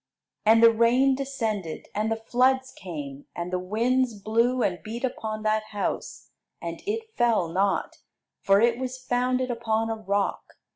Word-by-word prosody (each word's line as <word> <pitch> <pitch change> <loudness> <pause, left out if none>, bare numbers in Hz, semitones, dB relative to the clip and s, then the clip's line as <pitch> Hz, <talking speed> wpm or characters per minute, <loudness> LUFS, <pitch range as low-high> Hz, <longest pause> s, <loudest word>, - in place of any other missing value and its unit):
And 225 +1 +6
the 230 - +9
rain 240 +4 +4
descended, 225 - -3
and 215 +2 -1
the - - +2
floods 260 +3 +1
came, 145 -6 -8
and 175 +1 -4
the 180 - +1
winds 230 +4 0
blew, 230 +4 +1
and 180 -2 -1
beat 230 +3 -6
upon 220 -4 -3
that 215 0 +1
house; 205 -2 -4 0.3
and - - -6
it 445 +1 -3
fell 230 -8 +2
not, 195 +3 0 0.4
for 195 0 +4
it 235 +2 +3
was 255 0 -4
founded 255 0 0
upon 225 -1 -1
a - - -1
rock. 200 -2 -2
225 Hz, 155 wpm, -26 LUFS, 205-255 Hz, 0.4 s, the